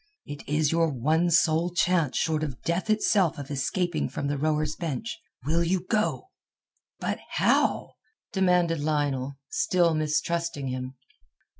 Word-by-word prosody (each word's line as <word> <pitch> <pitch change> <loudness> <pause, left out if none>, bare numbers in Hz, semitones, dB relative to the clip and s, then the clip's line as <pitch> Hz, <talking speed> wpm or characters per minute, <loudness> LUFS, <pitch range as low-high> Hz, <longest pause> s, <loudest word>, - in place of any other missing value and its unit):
It 145 0 -7
is 150 0 +2
your 165 0 +2
one 155 +6 +1
sole 165 0 +3
chance 175 -5 +1
short 155 -1 0
of 135 -6 -5
death 170 +5 -1
itself 205 -5 +2
of 145 0 -7
escaping 155 +4 -1
from - - -4
the 145 - 0
rower's 155 0 0
bench. 170 - -4 0.2
Will 165 +3 +2
you 180 +1 0
go?" 220 - 0 0.7
"But - - -2
how?" - - +1 0.4
demanded 180 -4 +2
Lionel, 145 -3 -1
still 175 -2 +2
mistrusting 155 -1 -1
him. 130 +1 -5
160 Hz, 135 wpm, -27 LUFS, 145-175 Hz, 0.7 s, sole